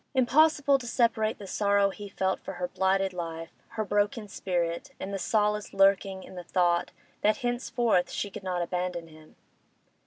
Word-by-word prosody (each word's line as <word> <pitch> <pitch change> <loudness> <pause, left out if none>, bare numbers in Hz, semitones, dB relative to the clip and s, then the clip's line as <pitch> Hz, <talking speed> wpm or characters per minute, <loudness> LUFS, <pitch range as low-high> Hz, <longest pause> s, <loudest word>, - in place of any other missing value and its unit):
Impossible 280 +2 +4
to 245 - -8
separate 225 -2 +1
the 205 - -9
sorrow 200 0 +2
he 205 0 -9
felt 190 -1 -1
for - - -7
her 180 0 -3
blighted 190 +1 +1
life, 165 -1 -5 0.3
her 215 - 0
broken 205 +2 0
spirit, 175 -4 -2
and 195 - -5
the 195 - -2
solace 210 +3 0
lurking 195 -1 +3
in - - -12
the 180 -1 -7
thought 175 -1 +1 0.3
that 215 +1 +3
henceforth 240 -5 +1
she 205 - -3
could - - -8
not 180 -2 -1
abandon 175 -1 -3
him. 155 0 -17
195 Hz, 165 wpm, -28 LUFS, 180-215 Hz, 0.3 s, Impossible